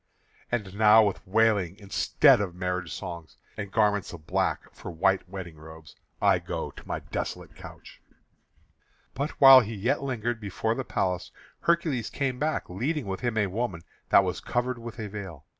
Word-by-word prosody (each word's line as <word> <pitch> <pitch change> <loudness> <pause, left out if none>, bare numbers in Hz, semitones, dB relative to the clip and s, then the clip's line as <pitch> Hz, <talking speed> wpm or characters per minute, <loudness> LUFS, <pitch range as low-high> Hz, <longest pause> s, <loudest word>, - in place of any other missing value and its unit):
And 105 -6 -2
now 110 +1 +7
with 100 - -2
wailing 100 -3 +2
instead 100 0 +3
of 90 -4 -4
marriage 90 -2 -3
songs, 85 -4 -7 0.2
and 100 -2 -6
garments 105 -2 +1
of 80 -3 -11
black - - -1
for - - -9
white 95 +2 +1
wedding 90 -4 -8
robes, 80 +1 -13 0.2
I - - +4
go - - -5
to - - -14
my - - -3
desolate - - -5
couch." - - -13 1.1
But 140 +4 -2
while 135 -2 +11
he 115 -2 -3
yet 120 +8 0
lingered 120 -3 -3
before 105 +2 -1
the 130 - -3
palace 90 -6 -2 0.3
Hercules 160 -9 0
came 130 -3 -2
back, 155 +1 -1
leading 130 - -2
with 95 -1 -4
him 120 -2 -2
a 105 - +3
woman 95 -3 -3 0.3
that - - +6
was - - -2
covered 125 0 -2
with 115 0 -8
a 110 -2 -4
veil. 95 -8 -8
105 Hz, 170 wpm, -27 LUFS, 90-120 Hz, 1.1 s, while